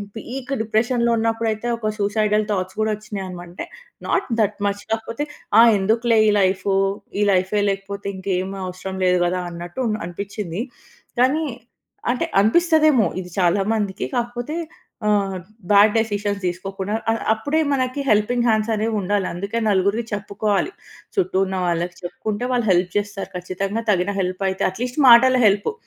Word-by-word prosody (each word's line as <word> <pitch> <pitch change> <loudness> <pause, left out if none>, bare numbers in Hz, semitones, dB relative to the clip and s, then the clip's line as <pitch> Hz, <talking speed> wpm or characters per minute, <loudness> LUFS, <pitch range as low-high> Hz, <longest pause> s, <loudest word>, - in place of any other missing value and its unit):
Peak 250 +4 -7
డిప్రెషన్‌లో 235 +2 +1
ఉన్నప్పుడైతే 225 0 -1
ఒక 215 -2 -2
సూసైడల్ 210 +1 +1
థాట్స్ 185 -2 -2
గూడా 215 0 +1
వచ్చినాయి 210 -2 -6
అనమంటే 175 -1 -8 0.4
నాట్ 390 - 0
దట్ 210 -1 +1
మచ్. 200 0 -1
కాకపోతే 225 +4 -2 0.4
ఆ - - +10 0.2
ఎందుకులే 225 +4 +2
ఈ - - +5
లైఫు, 190 +1 +1 0.5
ఈ - - +3
లైఫే 190 +2 +1
లేకపోతే 200 +1 -4
ఇంకేమి 190 0 -2
అవసరం 185 +1 -6
లేదు 180 0 +3
గదా 180 +1 0
అన్నట్టు 175 +6 -8
ఉన్ 215 - 0
అనిపించింది. 195 +1 -5 0.6
కానీ 270 +6 +3 0.7
అంటే 250 - -1
అనిపిస్తదేమో 310 - +4
ఇది 180 -1 -7
చాలా 180 +2 +3
మందికి. 200 -3 -2
కాకపోతే 240 +4 -3 0.5
ఆహ్, 200 -2 +1 0.3
బ్యాడ్ 205 +1 +6
డెసిషన్ 205 -2 -1
తీసుకోకుండా 195 +3 -3 0.2
ఆహ్, 225 - -2
అప్పుడే 285 +9 -1
మనకి 255 +1 -1
హెల్పింగ్ 235 +3 +2
హ్యాండ్స్ 220 0 +2
అనేవి 220 +1 -1
ఉండాలి. 195 0 0
అందుకే 200 +6 -4
నలుగురికి 200 +4 +1
చెప్పుకోవాలి. 205 - -1 0.5
చుట్టూ 365 - +1
ఉన్న 190 0 -4
వాళ్ళకి 175 0 -1
చెప్పుకుంటే 210 +6 -4
వాళ్ళు 240 -3 0
హెల్ప్ 180 0 +2
చేస్తారు. 205 -1 -3
ఖచ్చితంగా 195 +5 -3
తగిన 190 +1 +1
హెల్ప్ 185 +1 -3
అయితే 190 - -1
అట్‌లీస్ట్ 245 +8 -4
మాటల 255 +2 +7
హెల్ప్. 200 - +2
205 Hz, 145 wpm, -21 LUFS, 190-230 Hz, 0.7 s, ఆ